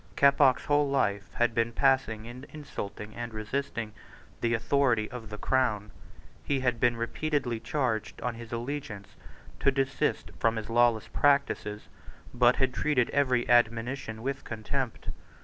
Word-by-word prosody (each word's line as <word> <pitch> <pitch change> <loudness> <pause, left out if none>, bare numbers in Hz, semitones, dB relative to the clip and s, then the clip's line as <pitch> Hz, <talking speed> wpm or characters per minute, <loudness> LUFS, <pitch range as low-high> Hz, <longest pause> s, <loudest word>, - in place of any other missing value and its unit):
Keppoch's 140 -2 +4
whole 145 -1 +2
life 100 -8 0
had 120 -1 +1
been 115 +1 0
passed 135 0 +3
in 110 0 -6 0.3
insulting 110 -8 -7
and 120 -1 -6
resisting 110 0 -3 0.5
the 120 0 +2
authority 115 -2 +2
of 120 -4 -8
the 105 - -6
Crown. 110 -5 0 0.5
He 140 -2 0
had 125 -2 0
been 120 -1 +2
repeatedly 125 0 -1
charged 120 -6 -2
on 125 0 -1
his 115 0 -10
allegiance 120 -4 -5 0.5
to - - +4
desist 135 -1 -1
from 115 0 +2
his 110 0 -5
lawless 120 -1 +3
practices, 140 -7 +1 0.5
but 120 0 +5
had 130 -1 +1
treated 130 -5 +1
every 130 -4 +2
admonition 115 -1 +1
with 135 +1 -3
contempt. 120 +3 -4
120 Hz, 140 wpm, -29 LUFS, 110-135 Hz, 0.5 s, but